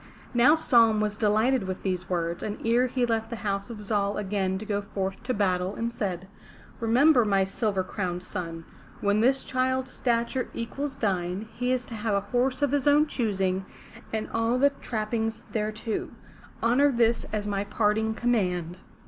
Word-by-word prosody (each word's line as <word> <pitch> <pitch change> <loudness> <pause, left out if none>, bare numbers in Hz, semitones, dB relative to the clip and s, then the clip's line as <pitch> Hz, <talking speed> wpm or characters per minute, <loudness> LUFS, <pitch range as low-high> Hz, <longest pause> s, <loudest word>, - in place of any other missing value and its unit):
*' - - -21
Now 250 +6 +6
Saum 230 -8 +4
was 210 -1 0
delighted 215 +2 +2
with 185 0 -5
these 185 -2 -2
words, 170 -1 -1
and 210 - -3
ere 240 +2 +3
he 250 0 0
left 225 -1 -1
the 235 - -4
house 200 +2 -1
of 215 -3 -7
Zal 200 -1 0
again 190 -2 -1
to 215 - -7
go 205 -1 -1
forth 195 -1 -4
to 250 +2 -2
battle 185 -2 0
he 230 0 -2
said: 190 -5 -3 0.5
"Remember, 245 +4 +5
my 195 -2 +3
silver 195 0 -1
crowned 180 -2 -3
son, 165 -4 -5 0.3
when 205 +1 +2
this 265 +3 +3
child's 260 0 -1
stature 240 +1 0
equals 270 +5 -4
thine, 190 0 -1
he 250 +1 -1
is 255 -1 0
to 240 - -9
have 215 -1 -1
a 200 - +2
horse 250 +6 0
of 285 - +2
his 285 0 +1
own 295 +1 +6
choosing, 195 -9 -1 0.5
and 220 -1 -2
all 230 +2 +1
the 280 +2 +4
trappings 225 -2 -3
thereto. 215 0 -2 0.5
Honor 275 +5 +4
this 235 -2 +2
as 210 -1 -3
my 200 -1 -1
parting 220 +1 +1
command." 180 -8 0
220 Hz, 175 wpm, -27 LUFS, 195-245 Hz, 0.5 s, Now